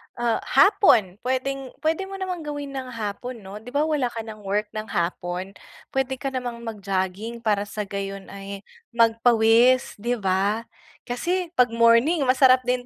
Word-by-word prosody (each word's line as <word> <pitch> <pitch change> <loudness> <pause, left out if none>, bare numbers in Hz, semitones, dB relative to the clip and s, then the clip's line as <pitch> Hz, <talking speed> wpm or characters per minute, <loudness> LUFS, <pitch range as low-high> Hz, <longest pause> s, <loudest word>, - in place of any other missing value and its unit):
ah, 240 -1 0
hapon 235 - +4
puwedeng-puwede 275 +6 -2
mo 390 - -7
namang 375 -2 -4
gawin 290 -1 -5
ng 265 -1 -5
hapon, 225 +2 -5
'no? 195 +2 -8
'Di 220 - -18
ba, 290 +1 +2
wala 300 -5 +1
ka 225 - -4
ng 215 -2 -10
work 210 +2 -1
ng 215 0 -5
hapon? 175 +1 -3 0.4
Puwede 265 0 -1
ka 270 +1 -4
namang 245 -2 -4
mag-jogging 205 +1 -3
para 205 -2 +1
sa 210 +1 -4
gayon 195 -1 -6
ay 195 0 -8 0.3
magpawis, 230 +1 +4
'di 240 +3 0
ba? 195 +4 +1 0.4
Kasi 345 +8 -2
'pag 250 -1 +6
morning 230 +7 +4
masarap 255 0 +5
din 250 0 -1
235 Hz, 155 wpm, -24 LUFS, 205-265 Hz, 0.4 s, pag